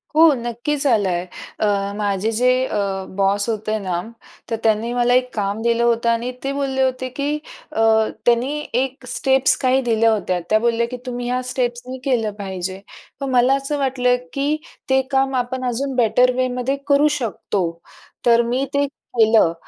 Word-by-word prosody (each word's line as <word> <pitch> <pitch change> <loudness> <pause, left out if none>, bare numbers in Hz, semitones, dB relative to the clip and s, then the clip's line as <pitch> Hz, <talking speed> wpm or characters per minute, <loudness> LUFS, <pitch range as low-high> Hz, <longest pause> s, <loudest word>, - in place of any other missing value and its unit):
हो 320 -1 +7
नक्कीच 240 +5 -2
आला 210 -6 +3
आहे 175 0 -1 0.3
अ, 200 -1 0
माझे 205 +1 0
जे 245 +3 +2 0.2
अ, - - -3 0.4
बॉस 200 +1 +2
होते 215 0 -1
ना, 180 -3 -2 0.5
तर 230 - 0
त्यांनी 225 +1 +1
मला 245 0 +2
एक 250 0 +2
काम 205 0 -2
दिलं 235 0 +1
होतं 235 0 +2
आणि 235 +2 0
ते 275 - -1
बोलले 270 -1 -1
होते 260 0 -1
की 280 +1 0 0.4
अ, - - -4 0.5
त्यांनी 250 +5 +2 0.2
एक 265 +1 -5
स्टेप्स 265 +1 +3
काही 260 +1 +3
दिल्या 230 -2 +2
होत्या. 185 -4 0
त्या 215 0 +4
बोलल्या 235 0 +1
की 250 - -4
तुम्ही 245 -1 -4
ह्या 250 +1 0
स्टेप्स 240 -1 -1
मी 260 - -5
केलं 230 -6 +1
पाहिजे. 190 -1 -5 0.4
पण 275 -1 -3
मला 250 +2 +4
असं 275 +2 -2
वाटलं, 255 -2 +2 0.2
की 285 +2 0 0.3
ते 265 0 +4
काम 270 0 +1
आपण 255 +1 -2
अजून 260 +3 -2
बेटर 250 +1 +4
वेमध्ये 255 +1 0
करू 285 +1 +4
शकतो, 200 -5 -2 0.6
तर 235 -1 +5
मी 245 +3 -1
ते 285 0 +2 0.3
केलं, 220 -6 +5
245 Hz, 170 wpm, -20 LUFS, 220-265 Hz, 0.6 s, हो